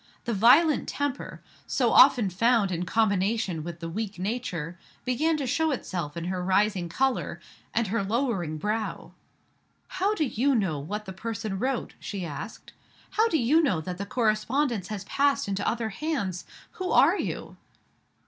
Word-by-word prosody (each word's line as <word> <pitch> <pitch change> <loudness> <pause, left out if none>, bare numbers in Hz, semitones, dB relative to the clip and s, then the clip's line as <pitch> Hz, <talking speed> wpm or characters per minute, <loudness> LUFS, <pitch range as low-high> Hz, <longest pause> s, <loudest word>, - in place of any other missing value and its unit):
The 235 - -1
violent 265 - +5
temper, 285 -1 -4 0.2
so - - +1
often 215 -6 +6
found 225 +1 +3
in 175 0 -2
combination 200 -5 +1
with 170 +1 -7
the 165 - -4
weak 210 +4 -4
nature, 180 -5 -3 0.3
began 305 +6 +1
to 285 - -2
show 320 +6 +1
itself 175 - -3
in 170 - -3
her 180 +1 -2
rising 190 -1 +1
color, 265 +8 0 0.3
and 230 0 +1
her 205 +1 -1
lowering 200 - -1
brow. 215 +6 -3 0.8
"How 395 +3 0
do 315 - +1
you 265 +2 +1
know 185 -10 0
what 210 +9 -5
the 190 - -7
person 210 -1 -4
wrote?" 260 0 -2
she 195 -3 -5
asked. 165 +7 -8 0.4
"How 445 +2 +3
do 320 - +2
you 295 +5 +4
know 245 - +1
that 180 +3 -6
the 200 - -4
correspondence 225 0 0
has 210 -3 -5
passed 280 +5 +1
into 195 0 -2
other 230 -1 -1
hands? 200 - -3 0.3
Who 370 0 -2
are - - +5
you?" - - -4
215 Hz, 160 wpm, -27 LUFS, 185-255 Hz, 0.8 s, often